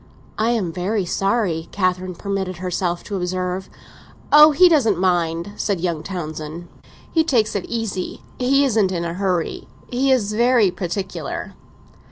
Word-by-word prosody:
"I 220 +2 +2
am 215 -8 0
very 190 +3 -1
sorry," 190 -4 0
Catherine 185 -1 -1
permitted 190 -2 -3
herself 175 -1 -2
to 205 - -5
observe. 180 +1 -3 0.6
"Oh, 300 +1 +9
he 315 +5 +6
doesn't 255 - +3
mind," 175 0 0
said 200 -4 -1
young 170 -3 -2
Townsend. 160 -2 -6 0.4
"He 320 - +3
takes 225 -9 +1
it 200 - -2
easy—he 235 +5 -1
isn't 215 -7 +2
in 170 -2 -2
a 170 - -3
hurry. 180 -3 -2 0.2
He 265 +2 +2
is 215 -5 +2
very 235 -3 +4
particular." 185 +1 -4
190 Hz, 140 wpm, -21 LUFS, 175-225 Hz, 0.6 s, Oh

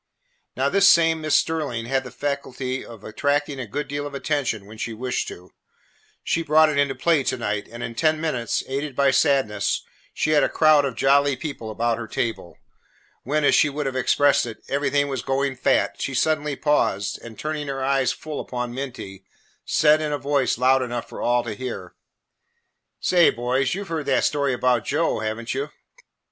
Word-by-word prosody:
Now, - - +2
this 200 0 +5
same 165 -3 +4
Miss 155 -1 +1
Sterling 145 -8 0
had 135 +2 0
the 125 - -8
faculty 130 -1 -3
of 115 -3 -12
attracting 145 +4 -1
a 125 - -5
good 145 +8 -4
deal 145 0 -3
of 140 - -9
attention 135 -8 -2
when 110 +2 -13
she 115 - -3
wished 125 +3 -2
to. 90 +1 -10 0.7
She 165 - 0
brought 155 0 +4
it 145 -2 0
into 140 -1 +1
play 165 -4 +2
to - - 0
night, 105 -3 -3
and 120 +1 -7
in 115 - -5
ten 155 +5 +1
minutes, 130 -8 -1
aided 140 +1 -3
by 140 0 +3
Sadness, 110 - +1 0.3
she 155 - -1
had 150 -1 +5
a - - +2
crowd 155 -2 +4
of 130 -4 -3
jolly 140 0 +3
people 130 -5 -6
about 115 +2 -1
her 115 - -6
table. 110 -7 -3 0.6
When, 150 +4 -1
as - - +4
she 145 - +4
would 145 +1 -4
have 135 -1 -2
expressed 140 0 +3
it, 115 - -9
"everything 145 +1 +1
was 135 -2 -3
going 135 0 -1
fat," 125 - +1
she 135 - -2
suddenly 150 +1 +1
paused 135 -10 0
and, 115 -2 -11
turning 155 -1 -4
her 135 -1 -3
eyes 135 -2 +2
full 150 +2 -6
upon 125 -1 -4
Minty, 120 -8 -7 0.4
said 155 0 +4
in 155 -1 -2
a 145 - 0
voice 140 -3 0
loud 130 +2 +4
enough 120 -1 -4
for - - -8
all 120 0 +2
to 115 -2 -4
hear, 105 -6 -6 1.1
"Say, 175 -2 +4
boys, 125 +5 0
you 200 - -4
've - - -15
heard 160 -3 -3
that 135 - +2
story 140 -2 +1
about 125 -2 +1
Joe, 155 -3 0
have 110 0 -2
n't 115 - -4
you?" 140 +3 -3
135 Hz, 195 wpm, -23 LUFS, 120-145 Hz, 1.1 s, this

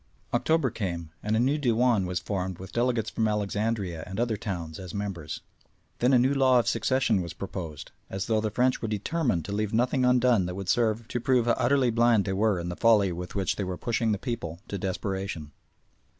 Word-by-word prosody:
October 160 -6 +2
came, 85 -8 -4
and 105 +1 0
a - - +2
new 135 +5 +2
Dewan 120 -6 +2
was 90 0 -2
formed 95 -3 -3
with 95 - -9
delegates 120 -2 0
from 110 - +1
Alexandria 105 -4 -1
and 95 +3 -5
other 120 -2 +1
towns 85 -6 -5
as 95 -1 -8
members. 95 -7 -4 0.6
Then 125 +2 +3
a 130 - +6
new 130 +3 +3
law 130 -2 +4
of 120 -2 +2
succession 115 -2 +2
was 85 -2 -5
proposed, 85 -5 -6 0.2
as 95 0 -3
though 110 -1 +1
the 110 - -1
French 125 +4 +1
were 115 - -2
determined 105 - -1
to - - -6
leave 105 +1 -1
nothing 125 +3 +2
undone 125 -6 +4
that 90 - -5
would 95 -2 -5
serve 115 -1 +1
to 120 - -2
prove 125 -1 +2
how 120 - +3
utterly 130 +1 +2
blind 115 -2 +3
they 95 - -1
were 105 -1 +2
in 85 +1 -4
the 90 - -4
folly 105 -3 +4
with 90 +3 -6
which 95 -2 0
they 100 - -1
were 90 -1 -4
pushing 115 +1 0
the 105 - +1
people 95 - -4
to 100 - -3
desperation. 95 -4 -3
105 Hz, 210 wpm, -27 LUFS, 95-120 Hz, 0.6 s, a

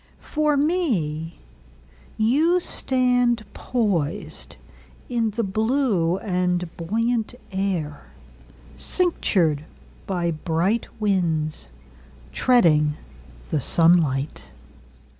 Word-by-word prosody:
For 300 -1 +2
me, 200 - -1 0.8
You 300 +11 +3
stand 245 -7 +1
poisedIn 210 - -3
the 230 - 0
blue 215 -4 +1
and 180 -3 -1
buoyant 225 +7 -1 0.2
air, 185 -7 -2 0.7
Cinctured 175 - 0 0.4
by 175 -3 0
bright 170 +7 0
winds, 160 - -1 0.6
Treading 155 - +3 0.6
the 150 - +1
sunlight. 145 - +2
190 Hz, 65 wpm, -23 LUFS, 160-240 Hz, 0.8 s, You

